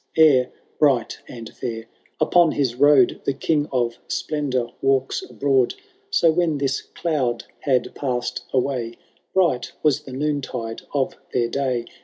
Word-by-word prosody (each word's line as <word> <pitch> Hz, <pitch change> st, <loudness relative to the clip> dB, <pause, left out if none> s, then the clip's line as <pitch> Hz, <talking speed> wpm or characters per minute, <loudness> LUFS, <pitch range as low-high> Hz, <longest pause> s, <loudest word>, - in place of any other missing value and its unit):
Ere, 140 Hz, -6 st, +5 dB, 0.3 s
bright 135 Hz, -6 st, +2 dB
and 115 Hz, -2 st, -9 dB
£ur, 115 Hz, -2 st, -5 dB, 0.3 s
upon 175 Hz, -3 st, +4 dB
his 135 Hz, -5 st, 0 dB
road 135 Hz, -1 st, +4 dB
The 140 Hz, -, 0 dB
King 150 Hz, +1 st, 0 dB
of 120 Hz, -3 st, 0 dB
Splendour 130 Hz, -6 st, -2 dB
walks 135 Hz, -, +1 dB
abroad; 135 Hz, -, +1 dB, 0.3 s
So, 170 Hz, -, +4 dB
when 160 Hz, -2 st, +1 dB
this 135 Hz, -1 st, 0 dB
cloud 135 Hz, -8 st, -2 dB, 0.2 s
had 130 Hz, -4 st, 0 dB
passed 125 Hz, -3 st, -2 dB
away, 125 Hz, -3 st, -1 dB, 0.4 s
Bright 175 Hz, -10 st, +2 dB
was 150 Hz, -4 st, +3 dB
the 135 Hz, -, -11 dB
noontide 130 Hz, -5 st, -3 dB
of 135 Hz, -2 st, 0 dB, 0.2 s
their 120 Hz, -2 st, +1 dB
day. 130 Hz, -3 st, -1 dB
135 Hz, 135 wpm, -22 LUFS, 125-145 Hz, 0.4 s, Ere